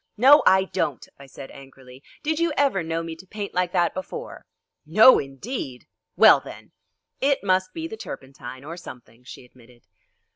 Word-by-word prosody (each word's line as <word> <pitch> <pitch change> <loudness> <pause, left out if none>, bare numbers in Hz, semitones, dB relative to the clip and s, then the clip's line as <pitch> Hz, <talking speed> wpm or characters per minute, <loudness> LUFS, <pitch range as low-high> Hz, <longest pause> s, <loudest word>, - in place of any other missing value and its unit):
"No, 275 +6 +7
I 190 0 +5
don't," 185 -8 -3
I 140 - -13
said 135 0 -11
angrily; 135 -1 -15 0.2
"did 315 +1 -1
you 335 -1 +1
ever 275 -10 +2
know 165 0 -3
me 165 -1 -7
to 185 +3 -15
paint 205 +1 -7
like 180 -1 -1
that 175 -2 +1
before?" 185 -1 -8 0.4
"No, 215 +11 +6
indeed!" 135 - -7 0.3
"Well, - - +7
then!" - - -13 0.5
"It 275 -3 +1
must 185 -1 +1
be 325 0 -6
the 220 - -9
turpentine, 130 - -10
or 165 +4 -8
something," 120 -7 -13
she 125 - -12
admitted. 125 -1 -21
170 Hz, 170 wpm, -23 LUFS, 135-210 Hz, 0.5 s, No